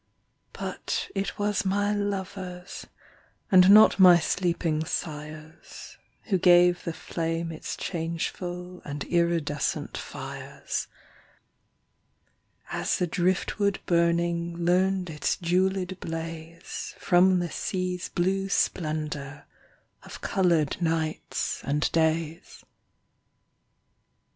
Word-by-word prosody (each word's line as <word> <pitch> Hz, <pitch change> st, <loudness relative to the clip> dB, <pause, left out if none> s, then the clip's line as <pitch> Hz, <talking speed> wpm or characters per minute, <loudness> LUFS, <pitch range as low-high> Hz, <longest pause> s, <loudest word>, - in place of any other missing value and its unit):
But -, -, -4 dB
it 195 Hz, -2 st, -3 dB
was 205 Hz, 0 st, 0 dB
my 205 Hz, +2 st, +1 dB
lovers, 190 Hz, -3 st, -4 dB, 0.6 s
And 185 Hz, -1 st, +7 dB
not 210 Hz, 0 st, +8 dB
my 180 Hz, -2 st, +9 dB
sleeping 170 Hz, -2 st, 0 dB
sires, 155 Hz, 0 st, -7 dB, 0.2 s
Who 195 Hz, -5 st, 0 dB
gave 175 Hz, 0 st, +5 dB
the 170 Hz, -, -1 dB
flame 165 Hz, 0 st, -3 dB
its 160 Hz, -, -6 dB
changeful 175 Hz, +1 st, -4 dB
And 145 Hz, 0 st, -5 dB
iridescent 170 Hz, -4 st, 0 dB
fires; -, -, -5 dB, 1.8 s
As -, -, 0 dB
the 180 Hz, -, +1 dB
driftwood 185 Hz, +3 st, 0 dB
burning 170 Hz, 0 st, +1 dB
Learned 185 Hz, 0 st, +2 dB
its 150 Hz, -, -1 dB
jewelled 185 Hz, +1 st, 0 dB
blaze 165 Hz, +1 st, -6 dB
From 185 Hz, 0 st, +4 dB
the 175 Hz, -2 st, -2 dB
sea's 185 Hz, -1 st, -3 dB
blue 195 Hz, +2 st, 0 dB
splendor 150 Hz, -6 st, -2 dB, 0.6 s
Of -, -, -11 dB
colored 170 Hz, -4 st, +1 dB
nights 160 Hz, -2 st, -1 dB
and 145 Hz, +2 st, 0 dB
days. 160 Hz, 0 st, -1 dB
175 Hz, 90 wpm, -27 LUFS, 165-185 Hz, 1.8 s, my